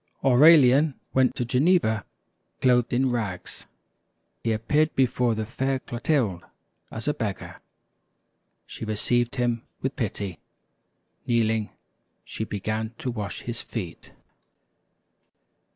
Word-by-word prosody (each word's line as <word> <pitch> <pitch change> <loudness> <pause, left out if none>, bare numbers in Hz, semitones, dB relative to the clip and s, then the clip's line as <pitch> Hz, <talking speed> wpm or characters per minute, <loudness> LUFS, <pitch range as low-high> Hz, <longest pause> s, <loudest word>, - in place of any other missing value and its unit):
Aurelian 140 +1 +6 0.2
went 130 -1 +3
to 120 - -1
Geneva 125 - +2 0.5
clothed 125 -2 +3
in 130 +1 +2
rags. 105 -7 -4 0.8
He 115 - +1
appeared 150 +8 +1
before 125 -2 +2
the 110 0 -2
fair 135 +4 -1
Clotilde 120 - -1 0.5
as 110 - -6
a 150 - +2
beggar. 110 - -5 1.1
She - - -9
received 120 +3 0
him 120 -2 0 0.2
with 135 +1 -1
pity. 100 -5 -4 0.9
Kneeling, 110 -2 +1 0.6
she 110 - -4
began 110 +2 -3
to 125 - -3
wash 105 -4 -5
his 120 0 -5
feet. 95 -8 -7
120 Hz, 105 wpm, -25 LUFS, 110-130 Hz, 1.1 s, Aurelian